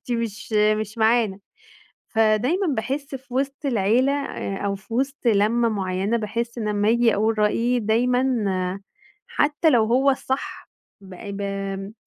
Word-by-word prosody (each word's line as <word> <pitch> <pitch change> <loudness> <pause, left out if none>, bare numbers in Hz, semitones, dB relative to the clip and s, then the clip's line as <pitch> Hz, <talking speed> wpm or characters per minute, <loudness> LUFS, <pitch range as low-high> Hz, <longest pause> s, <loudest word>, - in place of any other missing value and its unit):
أنتِ 245 - -5
مش 230 -2 -4
مش 215 +1 +1
معانا، 220 -3 +2 0.7
فدايمًا 225 - +2
باحس 270 +5 -3
في 255 -1 -12
وسط 275 +2 -2
العيلة 240 +2 +2
أ 280 -8 -4
أو 200 - 0
في 200 +4 -11
وسط 275 +1 -2
لمّة 225 +2 +3
مُعينة 195 +2 -1
باحس 235 +2 -4
إن 215 -2 -2
أمّا 205 0 +1
أجي 235 -1 +3
أقول 220 +1 +1
رأيي 235 +4 +2
دايمًا 245 +1 +1 0.8
حتى 295 +3 +2
لو 240 -6 +4
هو 255 +5 +3
الصح 265 0 -4 0.3
ب 190 -1 -12
ب 195 0 -5
225 Hz, 140 wpm, -23 LUFS, 210-250 Hz, 0.8 s, لو